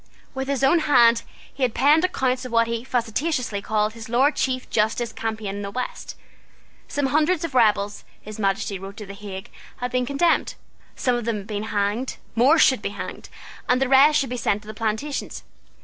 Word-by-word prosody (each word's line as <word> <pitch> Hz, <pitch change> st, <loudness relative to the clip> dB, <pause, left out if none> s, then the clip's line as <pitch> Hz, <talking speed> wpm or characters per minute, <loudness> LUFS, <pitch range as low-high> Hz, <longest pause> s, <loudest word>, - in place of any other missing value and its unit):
With 265 Hz, 0 st, -4 dB
his 275 Hz, -1 st, -1 dB
own 300 Hz, +6 st, +5 dB
hand 240 Hz, -6 st, +5 dB, 0.3 s
he 275 Hz, -, -12 dB
had 250 Hz, -3 st, +1 dB
penned 300 Hz, +4 st, +4 dB
accounts 260 Hz, -8 st, 0 dB
of 255 Hz, -, -7 dB
what 230 Hz, 0 st, +4 dB
he 230 Hz, 0 st, -3 dB
facetiously 250 Hz, -1 st, -1 dB
called 215 Hz, 0 st, 0 dB
his 225 Hz, -1 st, -10 dB
Lord 265 Hz, +6 st, +3 dB
Chief 255 Hz, -1 st, -1 dB
Justice's 220 Hz, +2 st, 0 dB
campaign 220 Hz, -2 st, -4 dB
in -, -, -5 dB
the 200 Hz, -, -4 dB
West. 250 Hz, +5 st, -5 dB, 0.7 s
Some 285 Hz, -, -1 dB
hundreds 310 Hz, +5 st, +2 dB
of 315 Hz, -, -6 dB
rebels, 210 Hz, -4 st, +2 dB, 0.2 s
His 215 Hz, +1 st, -10 dB
Majesty 195 Hz, -1 st, -1 dB
wrote 195 Hz, +2 st, -9 dB
to 210 Hz, -, -7 dB
the 200 Hz, -, -9 dB
Hague, 200 Hz, +1 st, -8 dB, 0.3 s
had 245 Hz, 0 st, -4 dB
been 250 Hz, -1 st, 0 dB
condemned. 305 Hz, +5 st, +1 dB, 0.4 s
Some 250 Hz, -, 0 dB
of 240 Hz, -, -5 dB
them 230 Hz, -2 st, -1 dB
had 200 Hz, -1 st, -8 dB
been 210 Hz, -1 st, -3 dB
hanged: 210 Hz, +4 st, -1 dB, 0.2 s
more 260 Hz, +8 st, +5 dB
should 260 Hz, -7 st, +4 dB
be -, -, -2 dB
hanged: 205 Hz, -, -7 dB, 0.4 s
and 250 Hz, 0 st, +4 dB
the 270 Hz, -, +1 dB
rest 275 Hz, +3 st, +6 dB
should 270 Hz, -3 st, -1 dB
be 250 Hz, -, -2 dB
sent 210 Hz, -3 st, 0 dB
to -, -, -17 dB
the 215 Hz, -, -6 dB
plantations. 225 Hz, +7 st, -3 dB
240 Hz, 200 wpm, -23 LUFS, 210-270 Hz, 0.7 s, rest